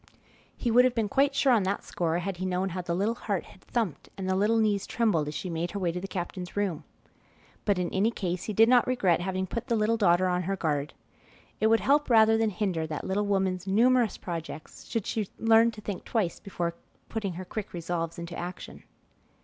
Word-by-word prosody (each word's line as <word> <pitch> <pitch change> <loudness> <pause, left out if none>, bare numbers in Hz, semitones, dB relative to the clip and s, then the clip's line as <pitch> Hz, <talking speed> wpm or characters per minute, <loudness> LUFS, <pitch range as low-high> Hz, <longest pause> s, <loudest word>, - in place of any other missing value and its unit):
He 240 - -1
would 245 +2 +7
have 255 -1 +2
been 225 -3 +1
quite 275 +4 +2
sure 275 -1 +3
on 225 - +4
that 195 +1 -1
score 165 -1 -1
had 180 +1 -3
he 185 - -3
known 185 +1 0
how 180 +1 -4
the 175 -1 -2
little 205 +5 +1
heart 205 -5 -3
had 190 - -17
thumped 225 - -3
and 190 -1 -4
the 190 - +1
little 210 +4 +2
knees 210 -3 +1
trembled 205 -11 +1
as 150 - -5
she - - -4
made 170 0 -2
her 200 - -4
way 175 -3 0
to 180 - -4
the 195 - -5
captain's 180 0 -5
room. 195 -7 -1 0.8
But 205 -3 +2
in 180 -1 -1
any 200 +4 +3
case 185 -5 -3
he - - -3
did 225 +3 +6
not 245 0 +5
regret 195 -10 +2
having 190 +1 -2
put 235 +6 -5
the 235 - +1
little 220 +1 +2
daughter 185 -3 +4
on 180 0 +1
her 195 +3 -1
guard. 150 -5 -2 0.6
It 220 - +3
would 225 0 +4
help 290 +2 +3
rather 225 -1 +6
than 225 0 +2
hinder 180 -5 -1
that 155 -1 -5
little 200 +2 0
woman's 190 -2 0
numerous 235 +3 +3
projects 165 -3 -7
should 225 -4 -3
she 215 -4 -2
learn 225 +1 +5
to 215 -2 -9
think 205 -3 -5
twice 205 -8 -1
before 175 -3 -3 0.3
putting 210 -5 -3
her 185 +2 -7
quick 210 +2 -5
resolves 170 -1 -3
into 170 0 -6
action. 175 +1 -7
195 Hz, 220 wpm, -28 LUFS, 175-225 Hz, 0.8 s, would